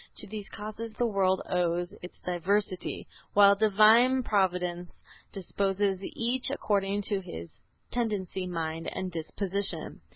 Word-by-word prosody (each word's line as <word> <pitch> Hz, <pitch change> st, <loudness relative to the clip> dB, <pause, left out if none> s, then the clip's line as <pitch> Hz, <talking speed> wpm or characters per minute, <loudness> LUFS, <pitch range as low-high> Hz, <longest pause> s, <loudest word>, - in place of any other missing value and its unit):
To 210 Hz, -, +2 dB
these 210 Hz, 0 st, -7 dB
causes 215 Hz, +1 st, -6 dB
the 240 Hz, -, 0 dB
world 195 Hz, -4 st, +1 dB
owes 175 Hz, -1 st, 0 dB
its 180 Hz, -, -10 dB
diversity, 185 Hz, +2 st, -1 dB, 0.3 s
while 200 Hz, 0 st, +8 dB
Divine 220 Hz, +5 st, +5 dB
Providence 180 Hz, -4 st, -1 dB, 0.3 s
disposes 195 Hz, 0 st, -1 dB
each 240 Hz, +6 st, -1 dB
according 205 Hz, -6 st, 0 dB
to 200 Hz, 0 st, +1 dB
his 85 Hz, -, -9 dB, 0.3 s
tendency, 200 Hz, -6 st, -2 dB
mind 165 Hz, -2 st, -3 dB
and 185 Hz, -1 st, -4 dB
disposition." 190 Hz, +4 st, -3 dB
195 Hz, 120 wpm, -29 LUFS, 180-215 Hz, 0.3 s, while